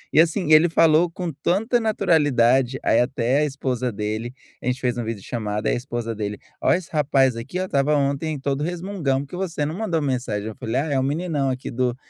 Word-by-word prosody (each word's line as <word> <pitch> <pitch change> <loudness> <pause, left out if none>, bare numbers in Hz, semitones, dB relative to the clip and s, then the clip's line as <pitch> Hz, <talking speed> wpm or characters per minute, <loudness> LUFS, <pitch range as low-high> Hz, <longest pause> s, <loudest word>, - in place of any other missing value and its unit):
E, - - +7
assim, 165 -1 0
ele 160 +2 +7
falou 165 +1 +4
com 170 -2 -5
tanta 205 - +1
naturalidade, 135 - +2
aí - - +3
até 125 +2 +1
a 150 - +2
esposa 130 -3 -2
dele, 110 +3 -3 0.3
a - - -6
gente 125 +1 0
fez 125 -2 0
uma 120 - -3
vídeo 110 -3 -5
chamado, 105 -3 -3
aí - - +2
a - - 0
esposa 120 -2 -4
dele: 105 -1 -4 0.2
"Ó, - - +3
esse 175 -2 0
rapaz 135 -5 +2
aqui, 115 +11 -5
ó, 185 - -1
estava 145 -2 +1
ontem 140 +2 -1
todo 140 +1 -1
resmungão 170 -6 -1
porque 145 +5 -8
você 170 -5 -2
não 155 +3 -3
mandou 180 -7 -1
mensagem." 120 -6 -2
Eu 110 - -6
falei: 115 +2 -4
"Ah, - - -3
é 135 - +2
o - - +1
meninão 145 -1 -1
aqui 130 0 -4
do 125 0 0
135 Hz, 220 wpm, -23 LUFS, 120-160 Hz, 0.3 s, E